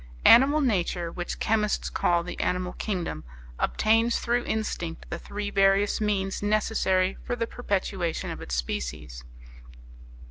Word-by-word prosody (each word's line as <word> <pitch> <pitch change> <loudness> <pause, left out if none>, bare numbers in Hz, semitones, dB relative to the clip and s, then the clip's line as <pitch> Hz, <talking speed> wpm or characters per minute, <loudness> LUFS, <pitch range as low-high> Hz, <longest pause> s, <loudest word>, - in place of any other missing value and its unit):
Animal 275 +6 +7
nature, 180 - 0
which 175 0 -5
chemists 215 -1 0
call 170 -1 +1
the 180 - -7
animal 180 0 -1
kingdom, 180 - -3 0.4
obtains 225 +2 +2
through 240 +1 0
instinct 175 -6 -3
the - - -3
three 205 0 -5
various 195 +1 +3
means 195 -2 -1
necessary 205 -3 +1
for 245 - -2
the 230 -1 -1
perpetuation 195 -7 -2
of - - -7
its 65 - -4
species. 60 +1 -4
195 Hz, 130 wpm, -26 LUFS, 175-220 Hz, 0.4 s, Animal